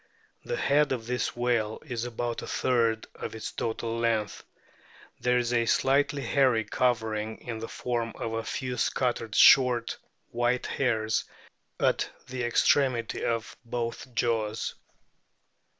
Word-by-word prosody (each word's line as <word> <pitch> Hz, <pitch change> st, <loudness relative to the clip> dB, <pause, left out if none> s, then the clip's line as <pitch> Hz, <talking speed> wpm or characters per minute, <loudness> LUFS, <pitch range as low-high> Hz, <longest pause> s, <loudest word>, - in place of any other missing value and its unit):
The 485 Hz, -, -3 dB
head 145 Hz, 0 st, +3 dB
of 115 Hz, -3 st, -4 dB
this 125 Hz, +1 st, -2 dB
whale 120 Hz, -3 st, 0 dB
is 120 Hz, -4 st, -3 dB
about 120 Hz, 0 st, -3 dB
a -, -, -7 dB
third 115 Hz, -3 st, +1 dB
of -, -, -6 dB
its 110 Hz, -, -5 dB
total 115 Hz, 0 st, -3 dB
length. 115 Hz, -3 st, 0 dB, 0.8 s
There 125 Hz, 0 st, +2 dB
is 120 Hz, 0 st, 0 dB
a 115 Hz, -1 st, +2 dB
slight 140 Hz, +2 st, +3 dB
hairy 135 Hz, -5 st, +2 dB
covering 110 Hz, -1 st, 0 dB
in 115 Hz, -2 st, -6 dB
the 115 Hz, -, -5 dB
form 120 Hz, -2 st, -2 dB
of 115 Hz, -, -4 dB
a 115 Hz, 0 st, -2 dB
few 125 Hz, +2 st, -3 dB
scattered, 120 Hz, -3 st, -1 dB
short, 125 Hz, -3 st, +6 dB, 0.3 s
white 120 Hz, +1 st, +1 dB
hairs 110 Hz, -4 st, 0 dB, 0.5 s
at -, -, +1 dB, 0.2 s
the 125 Hz, 0 st, -4 dB
extremity 120 Hz, 0 st, +2 dB
of 115 Hz, -1 st, -2 dB
both 120 Hz, +1 st, -4 dB
jaws. 110 Hz, -2 st, 0 dB
120 Hz, 135 wpm, -28 LUFS, 115-125 Hz, 0.8 s, short